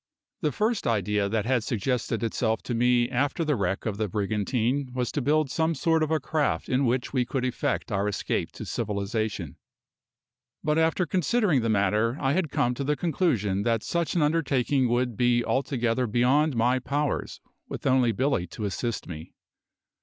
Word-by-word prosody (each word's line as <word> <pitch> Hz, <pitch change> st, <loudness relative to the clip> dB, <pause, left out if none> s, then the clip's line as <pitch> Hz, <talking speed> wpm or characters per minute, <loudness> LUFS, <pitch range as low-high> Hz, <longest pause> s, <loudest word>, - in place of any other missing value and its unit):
The 150 Hz, -, +1 dB
first 215 Hz, -, 0 dB
idea 105 Hz, -2 st, +1 dB
that 110 Hz, 0 st, -1 dB
had 125 Hz, -2 st, +1 dB
suggested 120 Hz, +1 st, -1 dB
itself 115 Hz, 0 st, -1 dB
to 125 Hz, -, -3 dB
me 120 Hz, 0 st, +3 dB
after 140 Hz, +6 st, 0 dB
the 150 Hz, -2 st, +1 dB
wreck 95 Hz, -3 st, -2 dB
of 105 Hz, -3 st, -2 dB
the 110 Hz, 0 st, -1 dB
brigantine 110 Hz, +7 st, -1 dB
was 125 Hz, -1 st, -1 dB
to 145 Hz, -, -2 dB
build 150 Hz, +1 st, +1 dB
some 160 Hz, 0 st, +1 dB
sort 160 Hz, +3 st, +2 dB
of 155 Hz, -, +1 dB
a 160 Hz, -1 st, +2 dB
craft 150 Hz, +1 st, -1 dB
in 130 Hz, +1 st, +2 dB
which 125 Hz, +3 st, -1 dB
we 130 Hz, -2 st, +2 dB
could 125 Hz, +1 st, -2 dB
effect 125 Hz, -1 st, -2 dB
our 100 Hz, 0 st, 0 dB
escape 105 Hz, -, -2 dB
to -, -, -7 dB
civilisation; 105 Hz, -, -3 dB, 1.1 s
but 150 Hz, +1 st, +2 dB
after 165 Hz, +3 st, +2 dB
considering 180 Hz, -, +1 dB
the 115 Hz, -, -1 dB
matter 105 Hz, +4 st, +1 dB
I 135 Hz, 0 st, +1 dB
had 170 Hz, -2 st, 0 dB
come 125 Hz, -2 st, +1 dB
to 140 Hz, -, -4 dB
the 150 Hz, +2 st, +1 dB
conclusion 130 Hz, -, 0 dB
that 115 Hz, 0 st, 0 dB
such 170 Hz, 0 st, -1 dB
an 170 Hz, -, +3 dB
undertaking 140 Hz, -4 st, +1 dB
would 120 Hz, 0 st, 0 dB
be 120 Hz, -1 st, +3 dB
altogether 125 Hz, -2 st, 0 dB
beyond 130 Hz, +6 st, +2 dB
my 125 Hz, +3 st, +2 dB
powers, 145 Hz, +3 st, -2 dB, 0.3 s
with -, -, -7 dB
only 130 Hz, -3 st, +3 dB
Billy 125 Hz, -5 st, 0 dB
to 105 Hz, +5 st, -6 dB
assist 115 Hz, +4 st, -3 dB
me. 80 Hz, -2 st, -8 dB
125 Hz, 175 wpm, -26 LUFS, 110-145 Hz, 1.1 s, me